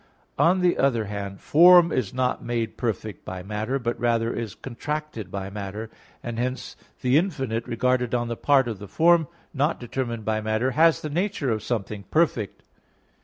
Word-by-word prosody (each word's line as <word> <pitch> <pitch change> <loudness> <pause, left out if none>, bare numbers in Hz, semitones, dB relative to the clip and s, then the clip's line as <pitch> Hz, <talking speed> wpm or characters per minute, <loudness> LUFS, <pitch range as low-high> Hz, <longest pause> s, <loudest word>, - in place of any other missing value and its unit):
On 180 +2 +4
the 180 -1 +2
other 120 -5 +2
hand, 100 -1 -6
form 175 +1 +7
is 120 -7 -1
not 130 0 -1
made 115 -2 -2
perfect 110 -4 -3
by 95 -1 -6
matter, 105 +6 -2
but 120 -2 -3
rather 115 -1 +1
is 110 -4 -5
contracted 140 -4 -5
by 95 0 -5
matter; 105 +2 -6 0.3
and 120 -1 -4
hence 125 +1 -3 0.3
the 125 +2 +4
infinite, 135 - -2
regarded 125 +1 +1
on 120 -1 -1
the 115 - -3
part 135 0 +3
of 110 -5 -4
the 100 - -8
form 165 - +4 0.3
not 145 +3 0
determined 120 -2 -4
by 110 0 0
matter, 110 +4 0
has 160 +4 +4
the 155 - -3
nature 175 - -1
of 110 -1 -1
something 105 -3 -3
perfect. 150 - 0
120 Hz, 170 wpm, -25 LUFS, 110-145 Hz, 0.3 s, form